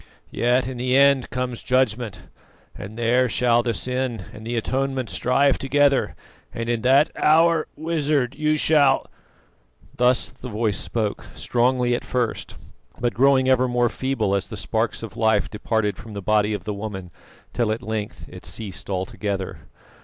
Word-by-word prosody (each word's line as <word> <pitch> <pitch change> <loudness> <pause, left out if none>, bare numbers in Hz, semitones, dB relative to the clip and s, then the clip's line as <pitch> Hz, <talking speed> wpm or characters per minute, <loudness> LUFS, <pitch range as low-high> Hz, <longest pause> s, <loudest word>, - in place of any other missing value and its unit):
Yet 125 +1 +1
in 130 -1 -5
the 125 +2 +1
end 140 -2 +4
comes 125 -1 -3
judgment; 125 -4 0 0.5
and 105 +3 -9
there 120 +2 +2
shall 120 0 +3
the 120 -1 -2
sin 125 -4 -3
and 110 +1 -10
the 120 - -2
atonement 130 0 -1
strive 135 +8 +2
together, 140 0 +2 0.4
and 115 0 -5
in 120 -1 0
that 135 +6 +4
hour, 165 +1 +3
Wizard, 150 -5 0
you 155 +1 +1
shall 145 -3 +4 0.5
" - - -30
Thus 125 +1 +2
the 125 - -9
voice 110 -1 -1
spoke, 110 -3 -3
strongly 125 0 +1
at 120 - -2
first, 125 -3 -2 0.4
but 120 -2 0
growing 130 +3 +4
ever 130 -1 +3
more 120 -1 +1
feeble 130 -7 -1
as 100 -1 0
the - - -7
sparks - - -2
of - - -8
life 110 -2 +2
departed 105 -1 -1
from 110 -1 -10
the 100 - -5
body 105 +1 +2
of 100 - -7
the 105 +1 -3
woman, 100 -3 -6 0.4
till 115 -3 0
at 110 - -3
length 110 -1 -4
it - - -12
ceased 105 -4 -6
altogether. 95 +1 -3
120 Hz, 160 wpm, -23 LUFS, 110-130 Hz, 0.5 s, end